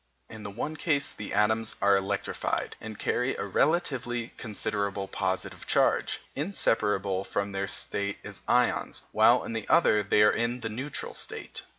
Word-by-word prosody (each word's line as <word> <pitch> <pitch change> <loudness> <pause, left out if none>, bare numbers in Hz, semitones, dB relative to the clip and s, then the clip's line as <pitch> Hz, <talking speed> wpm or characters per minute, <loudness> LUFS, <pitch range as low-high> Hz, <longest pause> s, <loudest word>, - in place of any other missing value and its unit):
In 110 - -8
the 105 - -6
one 135 +10 -4
case 145 -3 0
the 105 - -7
atoms 110 +1 +2
are 100 0 +5
electrified, 100 +1 -2
and 110 -2 -7
carry 125 +2 0
a - - -3
relatively 120 - 0
considerable 100 -2 -2
positive 95 -1 -3
charge, - - +2 0.2
inseparable 105 - 0
from 100 0 -2
their 100 0 -2
state 100 0 -1
as - - -8
ions, - - +1
while - - +5
in - - -5
the 115 -2 -4
other 160 -10 +5
they 105 +1 +4
are 105 - +6
in 120 +1 -1
the 110 - -3
neutral 130 +7 -4
state. - - -4
105 Hz, 160 wpm, -28 LUFS, 100-120 Hz, 0.2 s, are